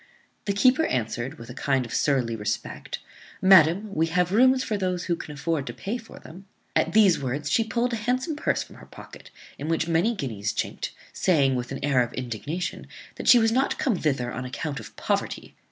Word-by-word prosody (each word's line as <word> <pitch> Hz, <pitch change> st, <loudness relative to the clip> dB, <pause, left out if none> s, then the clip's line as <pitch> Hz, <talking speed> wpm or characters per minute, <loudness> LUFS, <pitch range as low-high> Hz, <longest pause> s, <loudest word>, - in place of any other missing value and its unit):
The 200 Hz, -, 0 dB
keeper 255 Hz, +10 st, +4 dB
answered, 125 Hz, +4 st, -2 dB
with 115 Hz, -1 st, -10 dB
a -, -, -8 dB
kind 135 Hz, -1 st, 0 dB
of 115 Hz, -, -8 dB
surly 125 Hz, -5 st, +1 dB
respect, 105 Hz, 0 st, -4 dB, 0.4 s
"Madam, 190 Hz, +1 st, +5 dB
we 165 Hz, -1 st, +1 dB
have 180 Hz, +1 st, +1 dB
rooms 255 Hz, +4 st, +4 dB
for 215 Hz, -, -2 dB
those 185 Hz, -3 st, -1 dB
who 170 Hz, -, 0 dB
can 150 Hz, -, -8 dB
afford 145 Hz, -1 st, -2 dB
to -, -, -5 dB
pay 225 Hz, +5 st, -4 dB
for 225 Hz, -, -13 dB
them." 185 Hz, +5 st, -13 dB, 0.3 s
At -, -, +2 dB
these 205 Hz, -5 st, +5 dB
words 140 Hz, +3 st, -3 dB
she 225 Hz, -, +3 dB
pulled 235 Hz, +2 st, -1 dB
a -, -, 0 dB
handsome 255 Hz, +7 st, -1 dB
purse 295 Hz, -, 0 dB
from -, -, -16 dB
her -, -, -14 dB
pocket, -, -, -13 dB, 0.3 s
in 145 Hz, -, -4 dB
which 165 Hz, 0 st, 0 dB
many 170 Hz, +8 st, +2 dB
guineas 110 Hz, -, -3 dB
chinked, -, -, -3 dB, 0.2 s
saying, 145 Hz, -8 st, +3 dB
with 125 Hz, 0 st, -3 dB
an 135 Hz, -, -3 dB
air 135 Hz, -3 st, +3 dB
of 120 Hz, -, -2 dB
indignation, 130 Hz, -, -4 dB, 0.3 s
"That -, -, -6 dB
she 245 Hz, -, +9 dB
was 225 Hz, -1 st, +3 dB
not 260 Hz, +4 st, +1 dB
come 255 Hz, -8 st, +1 dB
thither 135 Hz, -7 st, -1 dB
on 125 Hz, -, -4 dB
account 135 Hz, +3 st, -4 dB
of -, -, -11 dB
poverty." -, -, -2 dB
165 Hz, 205 wpm, -25 LUFS, 135-215 Hz, 0.4 s, she